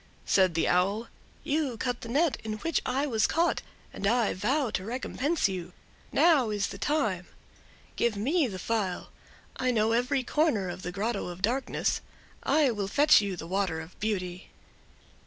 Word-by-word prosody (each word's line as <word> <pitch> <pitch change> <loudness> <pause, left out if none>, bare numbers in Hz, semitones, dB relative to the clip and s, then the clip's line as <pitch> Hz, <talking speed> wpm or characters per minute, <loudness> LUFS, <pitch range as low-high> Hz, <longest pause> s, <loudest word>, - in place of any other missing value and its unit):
Said 185 -4 +3
the 165 - +2
Owl: 200 +6 +1 0.3
"You 285 -5 -1
cut 245 +1 -2
the 230 - -7
net 290 +5 +2
in 220 -1 -3
which 325 +10 -1
I 265 +3 +1
was 225 -6 +2
caught, 340 +1 +1 0.3
and 200 - -2
I 230 0 +2
vow 245 +6 0
to 185 - -2
recompense 260 - -1
you. 180 -2 -5 0.4
Now 300 -9 +4
is 205 -1 -1
the - - -8
time. 220 - 0 0.7
Give 235 -2 +1
me 285 - +2
the 195 -5 -6
phial; 195 -2 -2 0.5
I 255 - 0
know 225 -2 +2
every 250 +3 +1
corner 250 - +1
of 175 - -6
the 175 - -4
Grotto 205 +2 -2
of 180 +2 -8
Darkness—I 265 +3 0
will 205 -3 -2
fetch 290 +4 +5
you 200 -2 -2
the 165 - -6
water 185 -2 -1
of 160 +2 -11
beauty." 185 -4 -3
220 Hz, 165 wpm, -28 LUFS, 190-270 Hz, 0.7 s, fetch